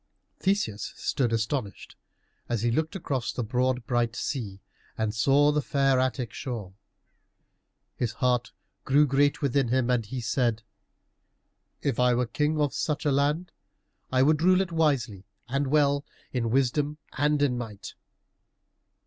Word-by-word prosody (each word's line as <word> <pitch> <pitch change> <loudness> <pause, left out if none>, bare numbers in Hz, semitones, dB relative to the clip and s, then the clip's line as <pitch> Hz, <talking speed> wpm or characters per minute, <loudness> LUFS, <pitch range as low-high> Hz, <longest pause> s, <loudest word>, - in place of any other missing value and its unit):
Theseus 185 - -1
stood 125 -4 0
astonished, 115 -1 -3 0.5
as 115 -2 -1
he 120 - +2
looked 160 - -1
across 135 -9 -2
the 125 - -3
broad 125 +2 0
bright 120 0 0
sea 105 -11 -4 0.4
and 110 -1 -1
saw 140 +6 +4
the 150 0 +1
fair 135 -2 +2
Attic 130 -3 -1
shore. 110 -8 -5 1.2
His 115 -3 -1
heart 125 -2 0 0.3
grew 145 +3 +4
great 145 +2 +2
within 140 -1 +2
him, 125 +1 +1
and 120 -2 +2
he 125 +5 -5
said, 115 -1 0 1.2
"If 135 -5 0
I 125 -1 +4
were 125 +1 +1
king 150 +5 0
of 145 -2 +1
such 150 0 -2
a 145 - +3
land, 145 +6 +1 0.6
I 130 0 +4
would 155 +2 +3
rule 185 +2 +5
it 185 -3 -3
wisely 130 - 0 0.2
and 140 +2 -1
well, 145 0 +2 0.3
in 120 -3 0
wisdom 135 +4 +1 0.2
and 150 +1 +2
in 130 -3 +2
might." 110 -5 -7
130 Hz, 145 wpm, -27 LUFS, 120-145 Hz, 1.2 s, rule